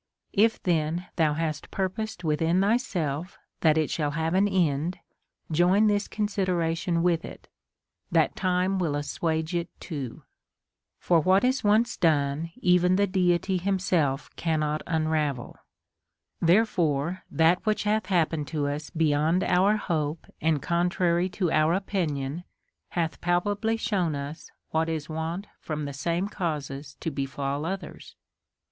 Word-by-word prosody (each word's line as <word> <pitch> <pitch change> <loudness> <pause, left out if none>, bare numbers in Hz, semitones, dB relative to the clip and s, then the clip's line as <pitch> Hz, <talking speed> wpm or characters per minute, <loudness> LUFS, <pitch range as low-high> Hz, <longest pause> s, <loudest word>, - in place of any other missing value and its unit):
If 220 +2 +3
then 170 0 0
thou 155 -3 +2
hast 155 -2 -3
purposed 195 +1 -3
within 165 +3 +2
thyself 185 - 0 0.2
that 160 -1 +4
it 155 -2 +1
shall 150 -3 0
have 160 +1 0
an 195 +2 +4
end, 170 -3 +1 0.5
join 180 +6 +4
this 205 -1 +2
consideration 175 -5 0
with 170 -2 +2
it, - - -10 0.6
that - - +3
time 185 0 +1
Λνϋΐ 155 -5 0
assuage 160 +3 -2
it 170 0 -1
too; 140 -8 -6 0.7
for 170 -2 +3
what 185 +4 +3
is 255 +1 +1
once 215 +3 +3
done 155 -1 +1
even 180 0 +4
the 200 +1 +3
Deity 185 -1 +1
himself 180 -7 0
cannot 155 -2 0
unravel; 155 -5 -1 0.9
therefore 170 -3 +2
that 165 +2 +3
which 215 -1 0
hath 210 -1 0
happened 165 -5 +1
to 150 -3 -1
us 145 +2 -4
beyond 160 +2 +2
our 190 +4 +3
hope 155 -5 -2 0.2
and 155 -3 +1
contrary 175 +1 +1
to 180 -3 -1
our 155 +2 +3
opinion 165 -6 -2 0.5
hath 165 -2 -2
palpably 205 +6 +1
shown 185 -9 0
us 140 +3 -6 0.2
Avhat 160 +1 +2
is 155 -2 -3
wont 160 +5 -3
from 155 -2 -4
the 140 - -5
same 170 +7 -1
causes 145 -7 -4
to 165 - -2
befall 140 +1 -3
others. 190 +1 -6
170 Hz, 135 wpm, -27 LUFS, 155-185 Hz, 0.9 s, that